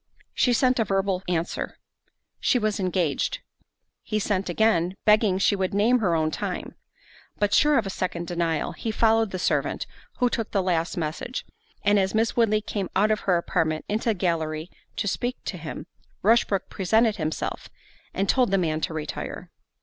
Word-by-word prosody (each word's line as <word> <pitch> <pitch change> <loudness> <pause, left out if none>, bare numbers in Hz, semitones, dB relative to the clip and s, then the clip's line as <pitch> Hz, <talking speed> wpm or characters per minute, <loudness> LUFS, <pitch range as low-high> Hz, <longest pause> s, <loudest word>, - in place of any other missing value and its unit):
She 250 - +2
sent 250 +1 +3
a - - +4
verbal 195 -2 0
answer, 170 -1 -2 0.6
"She - - +2
was 215 -2 0
engaged." 180 -6 0 0.6
He 215 - -2
sent 200 -2 -1
again, 185 -2 +2
begging 210 -3 +4
she 200 +1 +3
would 190 0 -1
name 230 +5 +4
her 180 -6 +1
own 155 -1 +1
time. - - -4 0.6
But 205 -1 +1
sure 295 +5 +5
of 225 - +1
a 195 - -3
second 175 -2 -3
denial, 170 -3 -1
he 225 - -5
followed 225 0 +3
the 185 - -4
servant 180 - 0 0.3
who 250 - +3
took 225 -2 -2
the 195 -2 0
last 175 -2 0
message, 165 - -3 0.4
and 205 0 +4
as 190 +1 0
Miss 225 +1 +1
Woodley 215 -2 +3
came 200 -3 -3
out 210 +3 +3
of 215 - +1
her 180 -3 +2
apartment 160 -2 -1
into 220 +3 -1
the 220 - +2
gallery 160 -2 -1 0.2
to 205 - -2
speak 245 +5 -1
to - - -3
him, 155 -1 -6 0.4
Rushbrook 210 -2 +3
presented 220 +3 +2
himself, 155 -2 -3 0.4
and 195 +1 -1
told 250 0 +3
the 195 - +2
man 160 -4 0
to 160 - -2
retire. 155 -1 -5
195 Hz, 175 wpm, -25 LUFS, 170-220 Hz, 0.6 s, sure